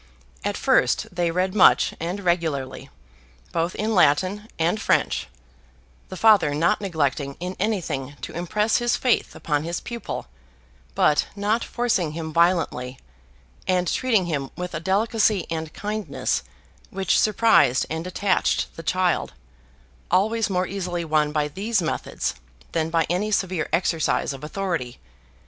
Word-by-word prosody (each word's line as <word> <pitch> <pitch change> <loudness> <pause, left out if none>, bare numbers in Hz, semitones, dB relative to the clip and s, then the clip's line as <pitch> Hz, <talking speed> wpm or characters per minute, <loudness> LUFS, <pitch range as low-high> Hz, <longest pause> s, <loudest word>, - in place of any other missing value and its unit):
At - - -1
first - - +2
they 175 -1 +1
read 185 +2 0
much 210 - +5
and 175 +5 -3
regularly, 165 -7 -1 0.6
both 170 +1 -1
in 220 +2 -1
Latin 185 +5 +2
and 170 +6 +1
French; - - +1 0.8
the 185 - -7
Father 205 -9 +5
not 165 +6 +2
neglecting 145 -6 -1
in 180 +2 -4
anything 160 -10 -2
to - - -6
impress 210 +6 +1
his 240 0 +1
faith 250 -2 +1
upon 150 -2 -1
his 170 +2 -3
pupil, 235 -1 -6 0.7
but 150 - +3
not 210 +3 0
forcing 205 -10 0
him 160 -1 -5
violently, 165 -7 +1 0.7
and 180 -1 +1
treating 225 -5 +2
him 145 -5 -2
with 180 0 -5
a 155 - -2
delicacy 205 +1 +1
and 160 -1 -3
kindness 210 +3 -2 0.5
which 190 -1 +1
surprised 215 - +4
and 160 +2 -4
attached 190 +1 0
the - - -5
child, 185 +1 0 0.8
always 220 +5 +2
more 185 -1 +1
easily 180 -3 -3
won 155 -1 +2
by 150 -1 0
these 200 +8 -1
methods 160 -3 -2 0.4
than 160 -1 0
by 165 -1 +2
any 185 +5 0
severe 185 -5 -1
exercise 165 -4 +1
of 135 +1 -10
authority. 165 -7 -3
180 Hz, 135 wpm, -24 LUFS, 160-205 Hz, 0.8 s, much